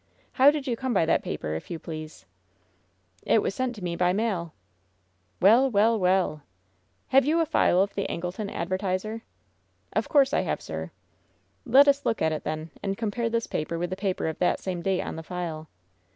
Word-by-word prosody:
How 265 +2 +6
did 295 -2 -1
you 245 -4 -1
come 255 -1 -2
by 165 - +3
that - - +2
paper, 75 0 -4
if 80 - -6
you 170 - -4
please 155 - -8 0.5
?" 90 +1 -42 0.2
"It 220 - +3
was - - -1
sent 255 +1 -2
to 205 - -10
me 170 -1 -2
by 180 +1 +2
mail 195 -6 -1 0.9
1'' 235 +7 +6
"WeU, - - -10
weU, 220 +2 +3
weUr 180 -5 +1 0.7
"Have 270 +1 +5
you 310 +5 +2
a 330 - +3
file 190 - +3
of 200 - -5
the 200 - -2
Angleton 180 +4 -4
Advertiserf* 190 +5 -2 0.7
"Of - - -1
course 280 -1 +4
I - - +3
have, 185 - -2
sir.'' 80 0 -6 0.8
"Let 275 +4 +7
us 280 0 +3
look 225 - 0
at 160 - +1
it, 155 - -3
then, 155 +1 -4
and 195 -1 -2
compare 230 +1 -1
this 230 0 -1
paper 160 +2 -3
with 175 +1 -3
the - - -1
paper 190 -3 -2
of 160 - -4
that 180 - +2
same 180 -2 -4
date 190 +1 0
on - - -6
the - - -5
file." 165 -2 -5
190 Hz, 205 wpm, -26 LUFS, 165-230 Hz, 0.9 s, Let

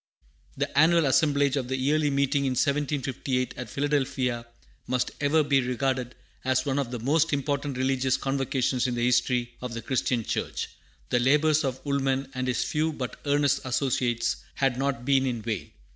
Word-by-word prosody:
The - - -2
annual 165 +2 +5
assemblage 140 0 +3
of 130 -3 -2
the 130 +1 -1
Yearly 145 +3 +2
Meeting 140 0 +1
in 130 - +1
1758 135 -2 -1
at 125 - -7
Philadelphia 130 -4 -1 0.4
must 125 0 0
ever 150 +2 +3
be 140 -2 +3
regarded 125 0 -1 0.3
as 130 0 +1
one 140 0 0
of 135 -4 -2
the 125 - -4
most 150 +7 +2
important 140 -1 -1
religious 130 0 +1
convocations 135 -2 0
in 125 - -2
the 120 0 0
history 120 -1 +1
of 125 -2 -5
the 115 - -4
Christian 125 -1 0
church. - - -3 0.4
The 120 - +2
labors 150 +4 +3
of 130 0 -3
Woolman 135 -1 0
and 130 0 -2
his 125 - +1
few 155 +1 0
but 130 -4 -5
earnest 145 -1 +2
associates 120 -3 0 0.2
had 135 -2 +1
not 135 -2 -2
been 135 -1 +3
in 120 -4 -3
vain. 110 -4 -3
135 Hz, 170 wpm, -27 LUFS, 125-140 Hz, 0.4 s, annual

